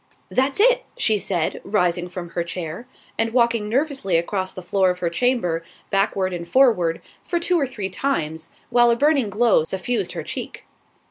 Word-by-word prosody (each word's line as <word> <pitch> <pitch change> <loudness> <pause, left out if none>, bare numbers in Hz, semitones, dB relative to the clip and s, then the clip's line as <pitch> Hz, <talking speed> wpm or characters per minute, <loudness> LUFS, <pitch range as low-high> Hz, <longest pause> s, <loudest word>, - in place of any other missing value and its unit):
"That's 265 +5 +1
it," - - +4
she 215 -2 +2
said, 175 -4 -2
rising 180 -3 0
from 175 -1 -7
her 170 - -2
chair, 170 +5 -6 0.3
and 225 0 +1
walking 235 -3 +2
nervously 270 - +1
across 185 +2 -2
the 185 - -9
floor 190 +1 +2
of 180 - -1
her 175 -2 -2
chamber, 180 -6 +1 0.3
backward 195 -1 +1
and 170 -1 -5
forward, 205 -11 +3 0.2
for 345 - -1
two 350 0 +1
or 280 - 0
three 200 -6 -5
times, 160 - -2 0.2
while 240 0 +5
a 235 - +4
burning 280 -3 +2
glow 215 -4 +3
suffused 190 +8 -2
her - - -4
cheek. - - -7
200 Hz, 175 wpm, -22 LUFS, 175-245 Hz, 0.3 s, while